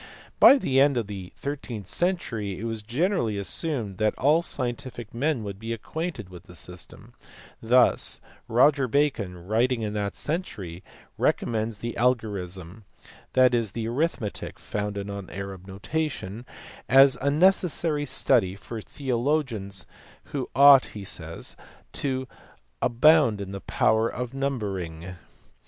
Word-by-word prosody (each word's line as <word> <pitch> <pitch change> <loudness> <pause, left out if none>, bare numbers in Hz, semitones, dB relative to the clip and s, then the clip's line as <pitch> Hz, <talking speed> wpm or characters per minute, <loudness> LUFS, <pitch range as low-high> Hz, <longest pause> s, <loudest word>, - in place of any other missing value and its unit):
By 280 - +9
the 135 - +1
end 140 -1 +4
of 115 - 0
the 95 -3 -7
thirteenth 130 -7 -5
century 115 - -1
it - - -6
was 115 -1 -3
generally 120 - 0
assumed 105 - -2
that 110 0 +1
all 150 +5 +4
scientific 125 -6 -4
men 135 0 0
would 100 -1 -6
be 115 +1 -4
acquainted 155 - -5
with 90 0 -12
the 90 -2 -13
system: 90 0 -9 0.5
thus 125 +3 +3 0.3
Roger 135 +3 +4
Bacon 110 -11 0
writing 115 +3 +1
in 105 -1 -3
that 100 -1 -2
century 100 - -4 0.4
recommends 110 -1 0
the 120 +2 -4
algorism 100 -6 -1 0.5
(that 130 -1 +5
is, 115 -5 0
the 115 -1 -3
arithmetic 125 -4 -2
founded 105 -1 -4
on 100 -2 -6
the - - -11
Arab 95 -1 -7
notation) 120 0 -4 0.4
as 135 0 +7
a 140 - +2
necessary 165 -2 +2
study 120 -7 +2
for 110 +3 -7
theologians 120 - -2 0.5
who - - -2
ought 140 0 +8
he 100 - -6
says 85 -3 -5 0.4
"to 130 -2 -2 0.5
abound 125 -2 +4
in 100 -1 -5
the 100 0 -6
power 110 +1 +2
of 125 0 -5
numbering." 95 -11 -3
115 Hz, 135 wpm, -26 LUFS, 100-140 Hz, 0.5 s, By